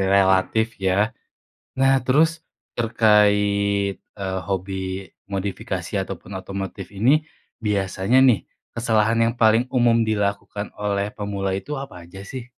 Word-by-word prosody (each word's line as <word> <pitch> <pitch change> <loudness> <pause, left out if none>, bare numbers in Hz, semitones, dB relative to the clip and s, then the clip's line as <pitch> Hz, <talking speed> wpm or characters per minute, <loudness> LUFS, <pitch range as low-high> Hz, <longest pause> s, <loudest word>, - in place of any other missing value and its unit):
relatif 95 +3 +3
ya. 100 +5 +1 0.7
Nah 135 0 +5
terus 155 +5 +4 0.5
terkait, 105 -3 +3
eee, 95 -2 -5
hobi 95 0 -2 0.6
modifikasi 95 -1 -3
ataupun 100 - -8
otomotif 95 0 -6
ini, 135 +10 +3 0.4
biasanya 100 +3 +1
nih 110 - +3 0.4
kesalahan 115 -1 +2
yang 115 - 0
paling 110 +2 +5
umum 115 -2 +3
dilakukan 105 -1 -2
oleh 100 0 -1
pemula 100 -2 -3
itu 100 +10 -6
apa 135 -11 -7
aja 95 +3 -11
sih? 120 +5 -7
100 Hz, 115 wpm, -22 LUFS, 95-115 Hz, 0.7 s, Nah